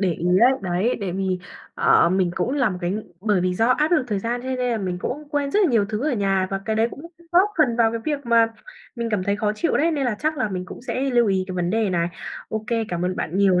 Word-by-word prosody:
để 185 -4 +2
ý 170 - -4
ấy, 250 +3 +6
đấy, 185 +6 0
tại 190 -3 -3
vì, 190 -1 -1 0.4
ờ, - - +4
mình 185 -1 +1
cũng - - 0
là 265 -7 +2
một 180 - -5
cái 175 0 -1
ng 210 +2 -3 0.2
bởi 205 -3 +1
vì 180 0 0
do 225 +4 +2
áp 300 +5 +2
lực 305 -7 +3
thời 205 -2 0
gian 240 +4 -3
cho 260 - -6
nên 260 -1 -2
là 225 - -1
mình 180 -3 -3
cũng 290 +9 -5
quên 285 -2 -1
rất 415 - +2
là 315 - +2
nhiều 220 -4 +3
thứ 220 +5 -3
ở - - -1
nhà 195 -2 +1
và 195 0 -2
cái 220 -1 -1
đấy 225 +2 +2
cũng 285 - -10 0.3
góp 375 +4 +5
phần 245 -6 +3
vào 225 -1 +3
cái 230 - -3
việc 290 -4 -2
mà 230 -1 +5 0.5
mình 235 -1 -2
cảm 195 -3 0
thấy 200 0 0
khó 210 0 0
chịu 335 - +1
đấy, 330 +3 +2
nên 285 -4 -1
là 220 - -1
chắc 310 -1 -1
là 220 - 0
mình 185 -2 -4
cũng 240 - -10
sẽ 255 0 -3
lưu 240 -2 +3
ý 190 -1 +1
cái 185 - -4
vấn 175 -1 -1
đề 220 -2 +1
này. 170 -1 0 0.4
OK, 220 0 -4 0.2
cảm 175 0 -2
ơn 185 0 -1
bạn 170 +4 -3
nhiều 190 -3 +4
215 Hz, 290 wpm, -23 LUFS, 185-250 Hz, 0.5 s, ấy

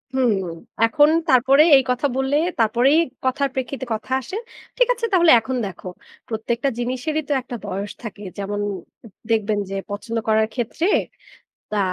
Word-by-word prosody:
হুম, 250 -4 +3 0.5
এখন 290 +6 +4 0.2
তারপরে 265 +3 +6
এই 270 - +2
কথা 250 +3 +1
বললে, 265 +1 0 0.2
তারপরেই 240 +8 +4 0.3
কথার 275 +2 +1
প্রেক্ষিতে 260 0 -4
কথা 220 +4 -6
আসে। 260 - -8 0.4
ঠিক - - +4
আছে? 475 -1 -3
তাহলে 345 -3 +6
এখন 255 +4 -4
দেখো। 190 -1 -10 0.4
প্রত্যেকটা 235 +4 -1
জিনিসেরই 255 +6 -2
তো - - +2
একটা 245 -1 -7
বয়স 200 +1 -4
থাকে। 210 -2 -8
যেমন 205 +1 -3 0.5
উ - - -10 0.2
দেখবেন 215 -1 +1
যে, 195 - -4 0.2
পছন্দ 225 +3 -4
করার 220 0 +3
ক্ষেত্রে 260 - -2 0.9
তা 210 - 0
245 Hz, 150 wpm, -21 LUFS, 220-275 Hz, 0.9 s, তারপরে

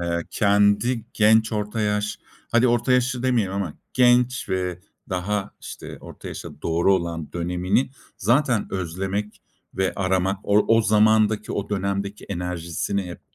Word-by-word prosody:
eee, 85 -1 -1
kendi 105 +3 +2
genç 110 +1 +4
orta 105 +1 -2
yaş 105 0 -1 0.3
hadi 120 +2 +4
orta 120 +2 +2
yaşlı 125 0 +1
demeyelim 120 -7 +1
ama 100 -6 -3 0.2
genç 125 0 +3
ve 90 -1 -2 0.3
daha, 95 +2 -2
işte, - - -9
orta - - -10
yaşa - - -9
doğru 85 +4 +3
olan 85 -4 -3
dönemini 90 +8 0 0.3
zaten 120 +1 +2
özlemek 95 +3 -3 0.3
ve 95 -1 0
aramak 95 0 0
o 105 +1 +3
o 115 - +4
zamandaki, 110 0 +3
o 100 0 -3
dönemdeki 100 0 -2
enerjisini 90 +1 -3
hep 90 -1 -8
100 Hz, 135 wpm, -23 LUFS, 90-110 Hz, 0.3 s, genç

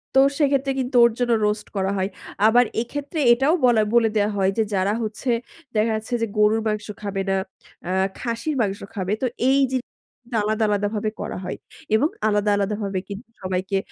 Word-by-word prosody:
তো - - +7 0.2
সেক্ষেত্রে 275 -2 +2
কিন্তু 255 0 -3
ওর 235 - +6
জন্য 245 -1 +1 0.2
রোস্ট 210 0 -2
করা 190 0 0
হয়। 190 +1 0 0.4
আবার 245 +2 +5 0.2
এক্ষেত্রে 290 +6 -5
এটাও 270 +7 +2
বলা 225 -3 +4
বলে 230 -2 +5
দেয়া 205 +1 +2
হয়, 190 0 +3
যে 220 - +3
যারা 195 +2 +1
হচ্ছে, 220 +4 -4 0.5
দেখা 215 +1 +2
যাচ্ছে 220 +3 -7
যে 230 - +1
গরুর 210 +1 +4
মাংস 210 0 -2
খাবে 200 -1 -2
না, 195 - +2 0.5
আ - - -1 0.3
খাসির 235 +5 -2
মাংস 200 -2 -1 0.2
খাবে। 190 +1 -1
তো - - +1 0.2
এই 275 +1 +4
জিন 260 -1 0 0.6
আলাদা, 215 +1 0
আলাদা, 205 0 +1
ভাবে 215 +1 -1
করা - - -4
হয়, - - -4 0.4
এবং 295 +8 +3 0.2
আলাদা, 210 0 +2
আলাদা, 205 +1 0
ভাবে 195 -2 -2
কিন্তু 210 +4 -8
সবাইকে 185 +1 -1
215 Hz, 185 wpm, -23 LUFS, 200-245 Hz, 0.6 s, তো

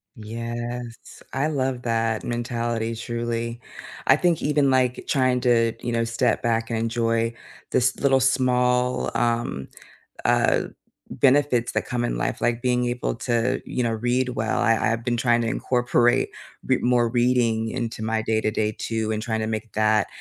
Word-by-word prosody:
Yes. 115 +2 -6
I 135 +3 +1
love 130 -4 -1
that 115 -2 0
mentality, 115 -1 -2
truly. 115 0 -3 0.5
I 135 - +7
think 170 0 +1
even, 145 -2 +2
like, 125 -1 +1
trying 130 -3 +2
to, 115 -2 +3
you 120 - -3
know, 115 0 +1
step 115 +1 0
back 115 -1 0
and 115 -1 -1
enjoy 115 0 0 0.4
this 130 +1 +2
little 135 -1 +3
small, 125 -1 +2
um, 115 - -1 0.6
uh, - - +3 0.5
benefits 135 -3 +2
that - - -1
come 120 -1 -2
in - - -1
life, - - -2
like 120 0 0
being 125 -1 +1
able 120 0 -2
to, 115 +1 -1
you 125 - -2
know, 115 - 0
read 125 +3 0
well 110 0 -1
I 115 -2 +4 0.2
I've 115 0 -4
been 120 -1 0
trying 120 -1 +2
to 115 - -1
incorporate 120 0 +2 0.4
re - - +3
more 120 -1 +3
reading 120 -2 +2
into 115 -3 -4
my 110 0 -1
day-to-day 110 -1 0
too, 110 -1 -2
and 110 0 -2
trying 110 -1 -2
to 110 - -2
make 110 0 -4
that 110 -1 +2
120 Hz, 160 wpm, -24 LUFS, 115-125 Hz, 0.6 s, I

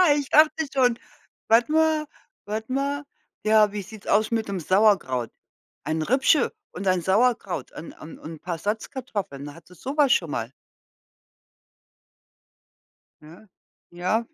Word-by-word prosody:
Ich 285 -2 -3
dachte 310 +1 +4
schon. 250 -3 +3 0.5
Warte 235 +6 +4
mal 315 -1 +3 0.4
warte 220 +3 -4
mal. 280 +2 -1 0.4
Ja, 215 -1 +5
wie 205 - -3
sieht's 210 +2 -12
aus 215 +2 +2
mit'm 220 -4 -1
Sauerkraut? 180 - +2 0.5
Ein 160 0 -2
Rippchen 265 - +3 0.2
und 190 +2 -6
ein 185 -1 +2
Sauerkraut 205 +1 +1
und 160 - -9
und 155 - -10
und 160 -1 -9
paar 175 -1 -4
'n - - -10
Salzkartoffeln. 205 - -4
Hat 165 -1 -16
sie 180 - -16
sowas 275 - +2
schon 165 - 0
mal? 115 0 -3 2.7
Ja. 165 +8 -15 0.4
Ja, 185 +6 0
215 Hz, 130 wpm, -24 LUFS, 175-260 Hz, 2.7 s, Ja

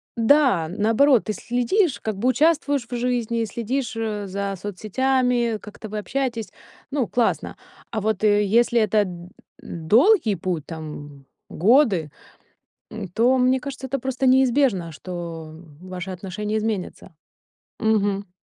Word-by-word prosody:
Да, 235 - +3
наоборот, 225 - +3
ты 215 - -2
следишь, 245 - 0
как 220 -2 -3
бы 245 +5 +1
участвуешь 285 -2 +2
в 245 - -4
жизни, 235 -2 -1
следишь, 235 +3 -3
э, 210 -2 -3
за 200 +1 -3
соцсетями, 240 +4 0
как-то 210 0 -10
вы 215 - -5
общаетесь, 235 -1 -3 0.4
ну, 275 -5 -1
классно. 240 -2 -1 0.3
А 225 - -2
вот, 215 -1 -1
э, 210 -1 +4
если 235 +3 +3
это 215 -1 +3
д 175 -1 -9 0.3
долгий 225 - +3
путь, 175 -4 -3
там, 150 -3 -9 0.2
годы, 200 - +3 1.0
то, 245 +3 +4
мне 255 +1 +3
кажется, 265 0 -7
это 270 +2 -2
просто 265 +1 -1
неизбежно, 255 - +3
что 165 -2 -7 0.3
ваши 185 0 -6
отношения 200 +4 -4
изменятся. 210 -5 -4 0.6
Мгм. 205 -3 0
220 Hz, 125 wpm, -23 LUFS, 190-255 Hz, 1.0 s, э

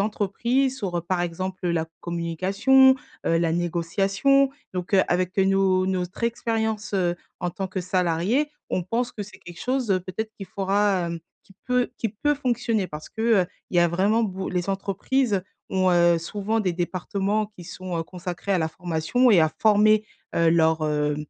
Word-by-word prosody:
entreprises, 235 +6 0
sur, 185 -4 -3
heu, - - -1
par 175 +1 -1
exemple, 185 +2 -4
heu, - - +1
la 165 -1 0
communication, 190 +11 +3 0.3
heu, 165 0 +3
la 165 -1 +1
négociation 195 +11 +2 0.2
donc, 180 +2 -4
heu, 190 - +6
avec 180 +1 0
nos 190 -1 +3
notre 185 +2 -3
expérience, 220 -2 -1
heu, 175 -2 +1 0.2
en 180 - -1
tant 190 +2 -4
que 185 0 -4
salariées. 185 - 0 0.2
On 180 - 0
pense 235 +6 -1
que 210 - -6
c'est 200 -1 -12
quelque 175 -1 -12
chose 255 -2 -1 0.2
peut-être 220 +4 -4
qu'il 195 - -8
faudra, 195 -2 +1
hem, 170 0 -4 0.2
qui 195 - -21
peut 250 -1 +1
qui 225 - -1
peut 295 +8 0
fonctionner 240 -6 0
parce 150 -1 -8
que, 220 - -9 0.2
heu, - - -4 0.2
il 175 - -1
y - - +6
a 175 - +4
vraiment 200 +7 +2
bo 190 -3 -3
les 180 +1 -2
entreprises, 200 +2 0 0.3
ont, 185 -1 +2
heu, 175 -1 +4
souvent 205 +6 -2
des 185 -4 0
départements 195 +4 -1
qui 190 -5 -14
sont, 180 0 -6
heu, - - 0
consacrés 180 +3 -5
à 185 - +3
la 160 -1 0
formation 180 +9 +1
et 185 -6 +6
à 155 - +3
former, 215 0 +5 0.3
heu, 165 -1 +3
leurs, 160 -1 +3
heu, 150 -1 0
190 Hz, 185 wpm, -24 LUFS, 175-215 Hz, 0.3 s, heu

